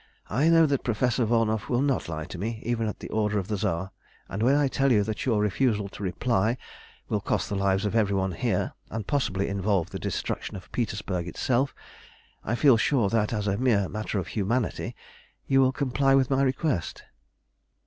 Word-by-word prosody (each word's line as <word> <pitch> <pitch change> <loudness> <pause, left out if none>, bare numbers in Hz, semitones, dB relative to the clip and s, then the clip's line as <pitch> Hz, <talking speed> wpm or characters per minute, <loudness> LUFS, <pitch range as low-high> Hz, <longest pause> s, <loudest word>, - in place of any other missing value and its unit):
"I 140 +10 +3
know 165 -1 +6
that 140 -3 0
Professor 120 +1 +1
Volnow 110 -1 +2
will 125 +1 +2
not 135 - 0
lie 80 -1 -4
to 90 - -8
me, 110 +3 -3
even 115 -1 0
at 105 - -5
the - - -7
order 105 -1 0
of 95 0 -3
the 105 - 0
Tsar, 95 +1 -2 0.4
and 100 - -4
when 130 +5 +4
I 145 -1 +3
tell 135 0 +1
you 105 -4 +4
that 110 +4 -4
your 115 -4 +2
refusal 105 0 +1
to - - -11
reply 110 +4 0 0.5
will - - -1
cost - - -1
the 100 - -2
lives 100 +1 +1
of 105 - -1
every 100 -3 +2
one 95 -1 0
here, - - -1 0.2
and 110 -2 -4
possibly 100 -6 0
involve 100 -3 0
the - - -5
destruction - - -3
of 95 -1 -10
Petersburg 100 -6 -2
itself, 125 - 0 0.7
I 115 - -1
feel 130 -2 +5
sure 125 -5 +2
that, 110 -1 +1
as 105 -3 -1
a 100 0 0
mere 110 -7 +2
matter 110 +1 -3
of 95 -2 -3
humanity, 110 +3 -1 0.5
you 135 0 +4
will 130 -1 +4
comply 135 0 +2
with 135 0 +2
my 135 0 +3
request." 130 - -1
110 Hz, 200 wpm, -27 LUFS, 100-130 Hz, 0.7 s, know